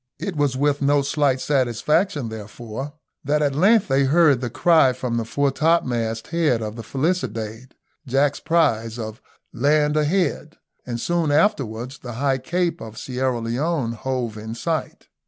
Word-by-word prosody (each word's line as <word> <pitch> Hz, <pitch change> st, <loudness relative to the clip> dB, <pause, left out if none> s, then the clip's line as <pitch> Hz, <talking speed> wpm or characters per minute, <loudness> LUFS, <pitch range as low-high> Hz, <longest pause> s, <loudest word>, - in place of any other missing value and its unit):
It 180 Hz, +4 st, -4 dB
was 145 Hz, -3 st, +1 dB
with 145 Hz, +1 st, +1 dB
no 145 Hz, 0 st, +3 dB
slight 140 Hz, -2 st, +1 dB
satisfaction, 140 Hz, -, 0 dB
therefore, 110 Hz, +5 st, -7 dB, 0.3 s
that 150 Hz, +2 st, +1 dB
at 140 Hz, -2 st, +1 dB
length 200 Hz, +8 st, +4 dB
they 135 Hz, 0 st, +2 dB
heard 145 Hz, -2 st, +4 dB
the 120 Hz, -, -2 dB
cry 135 Hz, +1 st, +4 dB
from 125 Hz, -2 st, -3 dB
the 115 Hz, -, -1 dB
foretopmast 130 Hz, -5 st, 0 dB
head 160 Hz, -8 st, +1 dB
of 105 Hz, 0 st, -5 dB
the 115 Hz, -, -6 dB
Felicidade, 130 Hz, -, -3 dB, 0.3 s
Jack's 140 Hz, +2 st, +1 dB
prize, 125 Hz, -9 st, +1 dB
of 110 Hz, -1 st, -6 dB, 0.3 s
"land 150 Hz, +4 st, +2 dB
ahead," 155 Hz, 0 st, 0 dB, 0.3 s
and 120 Hz, -1 st, -3 dB
soon 170 Hz, +1 st, 0 dB
afterwards 135 Hz, -, 0 dB
the 125 Hz, -2 st, -7 dB
high 135 Hz, +2 st, 0 dB
cape 175 Hz, +6 st, -1 dB
of 110 Hz, 0 st, -9 dB
Sierra 130 Hz, -1 st, -2 dB
Leone 125 Hz, +3 st, -1 dB
hove 120 Hz, -2 st, -3 dB
in 110 Hz, +1 st, -6 dB
sight. 160 Hz, +5 st, -3 dB
135 Hz, 150 wpm, -22 LUFS, 120-150 Hz, 0.3 s, length